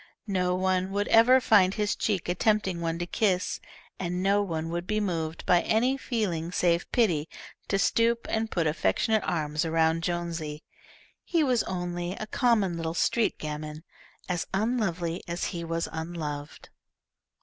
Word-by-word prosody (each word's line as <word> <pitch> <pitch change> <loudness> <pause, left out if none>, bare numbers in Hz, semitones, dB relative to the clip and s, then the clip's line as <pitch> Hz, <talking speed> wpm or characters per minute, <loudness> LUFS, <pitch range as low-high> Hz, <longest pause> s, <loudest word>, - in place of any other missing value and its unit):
No 180 -1 +1
one 185 0 +1
would 205 +1 0
ever 245 +3 +7
find 200 -6 +4
his 210 -1 0
cheek 200 -5 -1
a 175 - +1
tempting 190 -3 +1
one 165 0 -1
to 175 - -3
kiss, 185 0 0 0.4
and 180 0 -2
no 200 +1 +3
one 165 -4 -3
would 175 +1 -3
be 215 0 0
moved, 165 -5 -3
by 175 -1 +4
any 245 +5 +2
feeling 195 -11 -2
save 175 -1 +1
pity, 170 -11 +2 0.4
to 195 - +1
stoop 230 +4 +2
and 220 0 -1
put 170 -5 0
affectionate 155 - +1
arms 150 -3 -1
around 165 0 +2
Jonesy. 165 -3 -3 0.6
He 335 -3 +1
was 250 -5 +2
only 175 -1 -3
a 215 - -5
common 215 -7 +1
little 165 0 -3
street 230 +5 +1
gamin, 150 0 -6 0.4
as 175 -2 -2
unlovely 190 -6 -1
as 170 0 -3
he 170 -1 -4
was 165 0 -2
unloved. 160 -3 -6
180 Hz, 155 wpm, -27 LUFS, 165-210 Hz, 0.6 s, ever